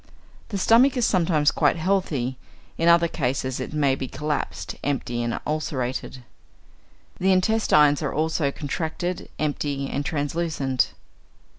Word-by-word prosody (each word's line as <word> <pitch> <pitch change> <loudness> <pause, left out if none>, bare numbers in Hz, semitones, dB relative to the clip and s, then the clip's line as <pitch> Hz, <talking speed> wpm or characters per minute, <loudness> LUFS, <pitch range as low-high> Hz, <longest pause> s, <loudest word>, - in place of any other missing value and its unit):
The 200 - -3
stomach 245 +7 +4
is 245 - +2
sometimes 165 -5 +2
quite - - +2
healthy; 160 -8 0 0.4
in 165 - 0
other 170 0 +5
cases 130 -4 -2
it 130 - -5
may 145 -3 +2
be 130 0 -3
collapsed, 150 +1 -3
empty, 125 -4 -1
and 120 0 -2
ulcerated. 130 -4 -3 1.0
The 190 +1 +3
intestines 185 -7 +4
are - - -1
also 155 -1 0
contracted, 160 +5 -4
empty, 145 -2 -2
and 140 - -2
translucent. 145 -4 -1
150 Hz, 125 wpm, -24 LUFS, 135-170 Hz, 1.0 s, other